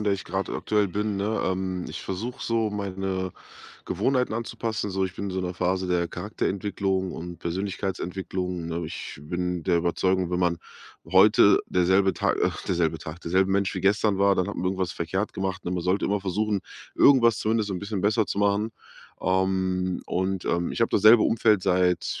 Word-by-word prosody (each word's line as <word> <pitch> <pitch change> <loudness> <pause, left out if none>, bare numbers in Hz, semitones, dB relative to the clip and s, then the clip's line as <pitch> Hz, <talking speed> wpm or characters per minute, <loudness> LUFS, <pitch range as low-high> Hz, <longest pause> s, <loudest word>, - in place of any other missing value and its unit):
in 105 - -3
der 100 - +2
ich 100 - -7
grad 95 +2 -3
aktuell 105 -2 0
bin, 105 +2 -2
ne? 105 +3 -1
Ähm, 95 -1 -2
ich - - -7
versuche 110 +7 -5
so 115 -2 0
meine 95 -2 -3 0.5
Gewohnheiten 125 +5 0
anzupassen 115 -2 -3
so. 95 0 0
Ich 90 -1 -5
bin 100 -1 -4
so 95 - -3
in 90 - -2
'ner 90 0 -4
Phase 95 +1 0
der 90 -1 0
Charakterentwicklung 95 0 -2
und 85 +1 -7
Persönlichkeitsentwicklung, 90 -1 -3
ne? 85 0 -3
Ich 80 - -7
bin 90 +2 -3
der 85 +1 +2
Überzeugung, 90 +1 +1
wenn 90 - 0
man 85 -1 +1 0.5
heute 100 +4 +6
der 90 -1 +1
selbe 95 +1 +4
Tag - - 0
ach, - - -2
derselbe 80 -3 0
Tag 80 +2 -8
der 85 - -6
selbe 95 +1 +3
Mensch 100 -1 +1
wie - - -2
gestern 100 0 +2
war, 100 0 +4
dann 90 0 0
hat 100 - -5
man - - -3
irgendwas 95 -1 -1
verkehrt 95 +5 -3
gemacht, 95 -1 -3
ne? 85 - -2
Man 90 -1 -2
sollte 95 +2 +1
immer 100 0 0
versuchen, 100 +2 -1 0.4
irgendwas 120 -5 +5
zumindest 110 -1 0
so 100 - -3
'n - - -3
bisschen 100 +1 -4
besser 105 +2 +2
zu - - -3
machen. 100 +2 +1 0.5
Ähm, 95 0 0
und, 95 0 -1
ähm, 85 0 0
ich - - -5
habe 115 - +3
dasselbe 110 +2 +6
Umfeld 110 -3 +3
seit 90 -1 +1
95 Hz, 195 wpm, -26 LUFS, 90-100 Hz, 0.5 s, heute